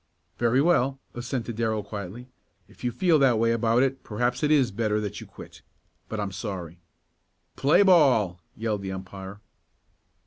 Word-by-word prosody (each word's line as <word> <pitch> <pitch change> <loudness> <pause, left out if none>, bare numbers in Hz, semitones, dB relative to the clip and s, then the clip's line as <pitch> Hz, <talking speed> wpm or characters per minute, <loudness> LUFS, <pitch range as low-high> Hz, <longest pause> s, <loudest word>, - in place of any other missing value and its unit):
"Very 120 +3 +3
well," 135 -6 +2
assented 120 -2 -4
Darrell 110 -2 0
quietly. 105 +4 -7 0.4
"If - - -19
you 125 - 0
feel 170 +1 +3
that 130 -4 +4
way 115 +1 +2
about 115 +2 +2
it 135 0 -1
perhaps 120 +3 -1
it 150 - +2
is 140 -5 +3
better 105 0 0
that 105 -2 -5
you - - -10
quit. - - -13 0.5
But 110 - -4
I'm 100 -1 -2
sorry." 90 -5 -6 0.8
"Play 145 +8 +4
ball!" 130 - +4 0.2
yelled 110 -2 -2
the 95 -1 -5
umpire. 95 +1 -8
115 Hz, 160 wpm, -26 LUFS, 105-130 Hz, 0.8 s, that